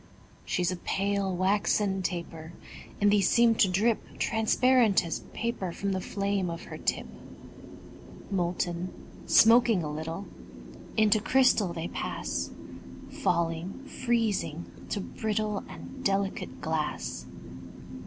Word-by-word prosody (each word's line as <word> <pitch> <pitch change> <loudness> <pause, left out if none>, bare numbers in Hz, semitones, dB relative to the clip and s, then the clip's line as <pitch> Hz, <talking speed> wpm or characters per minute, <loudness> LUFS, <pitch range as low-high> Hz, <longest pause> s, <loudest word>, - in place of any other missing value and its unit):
She's 180 -1 0
a 185 - -3
pale, 195 +1 -1
waxen 195 +1 +1
taper; 170 -2 -5 0.5
And 205 0 +4
these 205 -3 +4
seem 235 -1 +5
to 200 -3 +3
drip 210 +5 0
Transparent 225 -2 +3
as 165 - -3
paper 230 -6 -3
From 200 +3 -3
the 190 -1 -1
flame 200 -1 -1
of 170 0 -5
her - - -8
tip. - - -1 1.3
Molten, 175 -1 -1 0.4
smoking 225 -4 +6
a 150 - -3
little, 160 +5 -5 0.7
Into 215 0 +5
crystal 235 -5 +3
they 165 0 -4
pass; 60 0 -3 0.6
Falling, 170 +6 -1
freezing, 220 - -1 0.2
to 205 - -2
brittle 215 0 -2
And 85 +1 -10
delicate 195 0 -1
glass. - - -3
195 Hz, 115 wpm, -28 LUFS, 175-215 Hz, 1.3 s, smoking